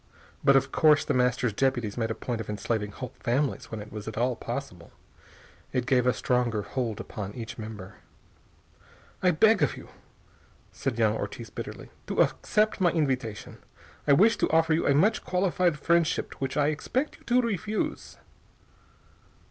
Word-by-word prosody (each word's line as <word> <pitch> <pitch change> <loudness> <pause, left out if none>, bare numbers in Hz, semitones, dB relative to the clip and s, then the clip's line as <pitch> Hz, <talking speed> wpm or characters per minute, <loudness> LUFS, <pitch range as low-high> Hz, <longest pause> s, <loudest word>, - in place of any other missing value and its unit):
But 140 -1 +6
of 135 0 +3
course 150 -2 +4
The - - 0
Master's 125 -2 +1
deputies 120 -4 0
made 115 -2 -1
a 110 - -2
point 120 -3 -4
of 110 - -8
enslaving 105 0 -2
whole 125 +4 -8
families 130 +4 -1
when 110 - -5
it 105 - -14
was 105 0 -7
at 110 - -6
all 125 +1 +1
possible. 115 -9 -6 0.8
It 125 -1 0
gave 125 -1 +2
a - - +6
stronger 120 -2 0
hold 120 -4 -3
upon 100 -1 -6
each 115 -1 -7
member. 105 -3 -8 1.2
"I 180 - +4
beg 220 +6 +4
of - - +1
you," - - -11 0.8
said - - -3
young - - +3
Ortiz - - -6
bitterly, - - -8 0.2
"to - - -3
accept 215 -2 0
my 175 - +5
invitation. 130 -10 -2 0.5
I 145 - +6
wish 215 +10 +5
to - - +1
offer 165 0 +3
you 160 - +1
a 140 - +4
much 210 +9 +3
qualified 180 -3 +1
friendship, 170 +2 +1
which 135 +1 -2
I 145 0 +3
expect 255 - -2
you - - -22
to 250 0 +3
refuse." 215 -1 -3
130 Hz, 165 wpm, -27 LUFS, 115-165 Hz, 1.2 s, But